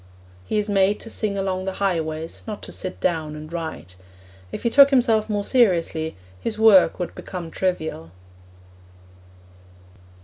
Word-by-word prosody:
He 215 Hz, -, -1 dB
is 210 Hz, 0 st, 0 dB
made 200 Hz, 0 st, +2 dB
to 225 Hz, -, -7 dB
sing 205 Hz, -2 st, -1 dB
along 190 Hz, -1 st, -2 dB
the 190 Hz, -, -2 dB
highways, 165 Hz, -4 st, -2 dB
not 210 Hz, -2 st, -6 dB
to -, -, -7 dB
sit 185 Hz, -, -4 dB
down 160 Hz, -4 st, -1 dB
and 155 Hz, +2 st, -9 dB
write. 160 Hz, -, -6 dB, 0.5 s
If -, -, -6 dB
he 235 Hz, -, +1 dB
took 280 Hz, +1 st, +8 dB
himself 230 Hz, -5 st, +2 dB
more 205 Hz, -1 st, -1 dB
seriously, 175 Hz, -10 st, +1 dB, 0.2 s
his 215 Hz, -, -3 dB
work 210 Hz, -6 st, +6 dB
would 180 Hz, -, -4 dB
become 175 Hz, -4 st, -7 dB
trivial. 160 Hz, -, -2 dB
190 Hz, 145 wpm, -23 LUFS, 165-210 Hz, 0.5 s, took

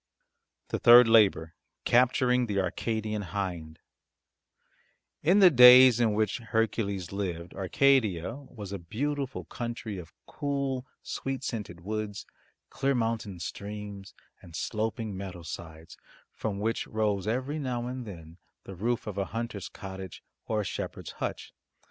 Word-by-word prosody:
THE -, -, -2 dB
THIRD 120 Hz, 0 st, +9 dB
LABOUR 100 Hz, -8 st, +4 dB, 0.3 s
CAPTURING 125 Hz, 0 st, +3 dB
THE 100 Hz, -2 st, 0 dB
ARCADIAN 110 Hz, +3 st, -2 dB
HIND 90 Hz, -5 st, -4 dB, 1.4 s
In 180 Hz, +7 st, +4 dB
the 185 Hz, -2 st, +8 dB
days 125 Hz, -1 st, +9 dB
in 110 Hz, -3 st, +2 dB
which 110 Hz, +1 st, 0 dB
Hercules 110 Hz, -5 st, -1 dB
lived, 90 Hz, -4 st, -4 dB
Arcadia 110 Hz, -2 st, +2 dB
was 125 Hz, -8 st, -10 dB
a 100 Hz, -, -4 dB
beautiful 135 Hz, -, -3 dB
country 115 Hz, -4 st, -5 dB
of 85 Hz, -2 st, -11 dB
cool, 140 Hz, -3 st, -3 dB, 0.2 s
sweet 135 Hz, 0 st, -4 dB
scented 105 Hz, -9 st, -5 dB
woods, 105 Hz, +1 st, -4 dB, 0.5 s
clear 135 Hz, 0 st, 0 dB
mountain 115 Hz, -5 st, -2 dB
streams, 100 Hz, +2 st, -7 dB, 0.3 s
and 85 Hz, -, -12 dB
sloping 110 Hz, +2 st, -3 dB
meadow 95 Hz, -2 st, -7 dB
sides 80 Hz, 0 st, -9 dB, 0.4 s
from 105 Hz, -3 st, -3 dB
which 110 Hz, +3 st, -1 dB
rose 105 Hz, -3 st, -1 dB
every 130 Hz, +7 st, -1 dB
now 125 Hz, -4 st, -2 dB
and 125 Hz, +1 st, -5 dB
then 85 Hz, -3 st, -11 dB, 0.2 s
the 95 Hz, -, -9 dB
roof 115 Hz, +6 st, -1 dB
of 100 Hz, -2 st, -4 dB
a 100 Hz, -, 0 dB
hunter's 115 Hz, -2 st, -5 dB
cottage 95 Hz, -2 st, -9 dB, 0.2 s
or 110 Hz, -1 st, 0 dB
a -, -, -5 dB
shepherd's -, -, -5 dB
hutch. -, -, -4 dB
110 Hz, 130 wpm, -28 LUFS, 95-125 Hz, 1.4 s, THIRD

